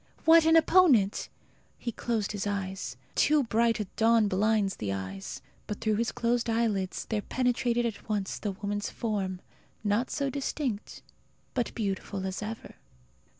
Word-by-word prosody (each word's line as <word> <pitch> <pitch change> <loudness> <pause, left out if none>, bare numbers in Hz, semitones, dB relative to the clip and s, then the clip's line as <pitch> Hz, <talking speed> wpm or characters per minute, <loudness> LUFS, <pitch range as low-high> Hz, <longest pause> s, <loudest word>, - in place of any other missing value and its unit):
What 325 0 +7
an 325 - +6
opponent! 315 - +4 0.5
He 235 - -4
closed 225 -2 -2
his 205 -1 -3
eyes. 190 -10 -3 0.2
Too 300 -1 +4
bright 230 -1 +2
a - - +1
dawn 225 -1 +4
blinds 200 0 +1
the 100 -2 -3
eyes. 95 0 -5 0.2
But 210 - -4
through 215 -2 +1
his 230 0 0
closed 235 0 0
eyelids 215 -5 0
there 215 -2 -1
penetrated 240 0 0
at 225 -1 -5
once 205 -3 -2
the 205 -2 -2
woman's 205 +1 -3
form 195 -5 -3 0.4
not 210 +4 +1
so 280 -2 -1
distinct, 265 -5 -3 0.5
but 245 -2 -1
beautiful 195 -2 -3
as 190 +1 -3
ever. 220 +1 -7
215 Hz, 150 wpm, -29 LUFS, 200-235 Hz, 0.5 s, What